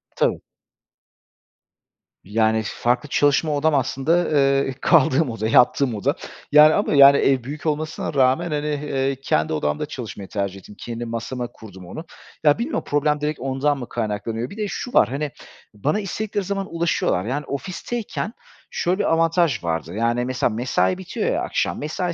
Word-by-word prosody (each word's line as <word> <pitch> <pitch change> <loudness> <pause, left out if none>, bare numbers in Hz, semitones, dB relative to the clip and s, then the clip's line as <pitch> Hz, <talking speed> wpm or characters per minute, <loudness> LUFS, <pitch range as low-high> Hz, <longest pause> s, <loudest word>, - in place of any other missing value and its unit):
Tabii. - - +1 1.8
Yani, 110 +2 +1
farklı 120 +7 -1
çalışma 145 +2 +2
odam 150 +1 +2
aslında, 140 +6 +1
eee, 135 -2 +2
kaldığım 155 -3 +4
oda, 115 -1 -3
yattığım 125 +1 +4
oda 100 - 0 0.4
yani 150 +1 +8
ama - - +1
yani, 140 0 +8
ev 135 -3 +2
büyük 145 +5 -7
olmasına 155 0 -2
rağmen, 140 +5 +2
hani, 150 0 -1
eee, 140 -2 -1
kendi 80 - +1
odamda 75 -1 -1
çalışmayı 100 -2 -8
tercih 100 -1 -3
ettim. 105 - -14
Kendi 120 0 -5
masama 120 +2 -4
kurdum 95 -6 -13
onu. 155 - -8 0.4
Ya, 150 +2 +5
bilmiyorum 260 +7 -2
problem 150 0 +1
direkt 150 -2 -2
ondan 135 +2 0
mı 125 - -7
kaynaklanıyor? 110 +1 -3
Bir 210 - -11
de 210 - -1
şu 245 - -5
var, 105 - +5
hani, 145 +2 -3 0.4
bana 145 - -1
istedikleri 205 +1 -3
zaman 195 -2 -4
ulaşıyorlar, 165 - 0
yani, 140 +5 -3
ofisteyken 205 - -4 0.4
şöyle 180 +3 -1
bir - - +2
avantaj 165 - +2
vardı, 80 0 -3
yani, 115 +3 0
mesela 125 -1 0
mesai 125 +10 0
bitiyor 190 -1 -2
ya - - -1
akşam, - - -1
mesai 170 +4 -2
140 Hz, 155 wpm, -22 LUFS, 115-155 Hz, 1.8 s, yani